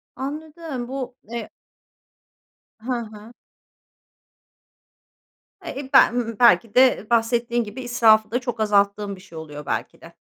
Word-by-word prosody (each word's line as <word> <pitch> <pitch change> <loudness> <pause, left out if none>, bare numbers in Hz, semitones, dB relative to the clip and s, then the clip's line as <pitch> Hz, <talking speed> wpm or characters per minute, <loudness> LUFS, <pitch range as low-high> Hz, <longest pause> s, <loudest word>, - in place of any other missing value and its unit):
Anladım, 300 -1 -6
bu, 260 -1 -5
eee 235 +1 -7 1.3
Hı 245 +4 -5
hı. 220 0 -10 2.3
Eee, 280 -5 -6
ben, 240 -4 +4
belki 235 -2 +4
de 255 -4 +4
bahsettiğin 235 +1 +1
gibi 215 +4 -8
israfı 220 -3 +3
da 245 - 0
çok 240 -2 -5
azalttığım 200 -1 +1
bir 185 - -15
şey 185 -4 -13
oluyor, 150 -2 -8
belki - - -4
de. - - -14
235 Hz, 115 wpm, -22 LUFS, 210-255 Hz, 2.3 s, ben